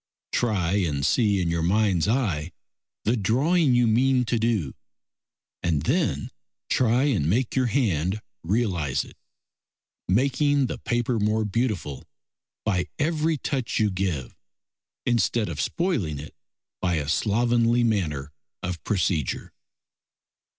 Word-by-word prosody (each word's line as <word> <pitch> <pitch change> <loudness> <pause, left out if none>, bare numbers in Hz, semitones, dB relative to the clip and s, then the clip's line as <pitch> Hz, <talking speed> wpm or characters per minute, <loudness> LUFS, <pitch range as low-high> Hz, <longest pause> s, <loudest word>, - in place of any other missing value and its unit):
Try 100 -5 +1
and 75 -7 0
see 105 -5 +3
in 85 -1 0
your 85 -1 0
mind's 95 0 +2
eye 90 - 0 0.5
the 115 - +2
drawing 135 - +2
you 120 0 +4
mean 125 +3 +3
to 120 0 0
do, 110 - 0 0.9
and 80 -4 0
then 95 - 0 0.4
try 125 +1 +3
and 110 - +1
make 120 +5 0
your 130 -2 +2
hand 100 - 0 0.2
realise 90 - 0
it, - - -15 0.9
making 140 - +2
the - - -4
paper 120 0 0
more 105 +1 +1
beautiful 105 - -2 0.6
by 90 -5 +1
every 155 +1 +1
touch 130 -3 -2
you 105 -2 +2
give 90 -9 -2 0.7
instead 120 -2 +1
of - - -3
spoiling 155 - -1
it 75 +2 -9 0.5
by 90 -2 +1
a 75 -2 -2
slovenly 115 +8 +2
manner 80 -11 -1 0.3
of 90 -1 -4
procedure. 90 - -1
110 Hz, 120 wpm, -25 LUFS, 85-125 Hz, 0.9 s, you